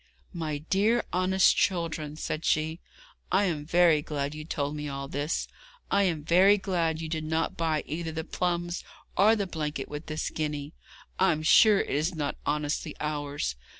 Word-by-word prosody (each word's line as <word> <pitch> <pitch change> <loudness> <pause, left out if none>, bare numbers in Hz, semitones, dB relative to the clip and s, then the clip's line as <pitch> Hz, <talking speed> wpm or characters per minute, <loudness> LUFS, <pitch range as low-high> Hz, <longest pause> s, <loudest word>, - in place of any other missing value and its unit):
'My 160 -4 -3
dear 200 +10 +1
honest 185 +1 +4
children,' 165 -5 -1
said 155 0 -4
she, 160 +2 +1 0.5
'I 190 +3 +4
am 160 -6 -1
very 170 -3 +4
glad 145 -1 -3
you 155 0 -7
told 150 -2 -3
me 150 -1 -4
all 140 0 -5
this. 145 +3 -2 0.4
I - - +4
am 165 -5 -1
very 185 +6 +5
glad 175 -5 0
that - - -6
you - - -3
did 155 0 -3
not 160 +1 -1
buy 160 -2 0
either 160 +1 -4
the 160 0 -4
plums 175 0 -2 0.3
or 215 +4 +5
the 205 -2 -1
blanket 150 -6 -4
with 150 +1 -7
this 155 0 -3
guinea. 150 -1 -3 0.5
I'm 165 -5 +2
sure 210 +5 +6
it - - -4
is 155 +5 0
not 145 -2 -2
honestly 150 +1 -1
ours. 145 - -2
160 Hz, 175 wpm, -28 LUFS, 150-175 Hz, 0.5 s, sure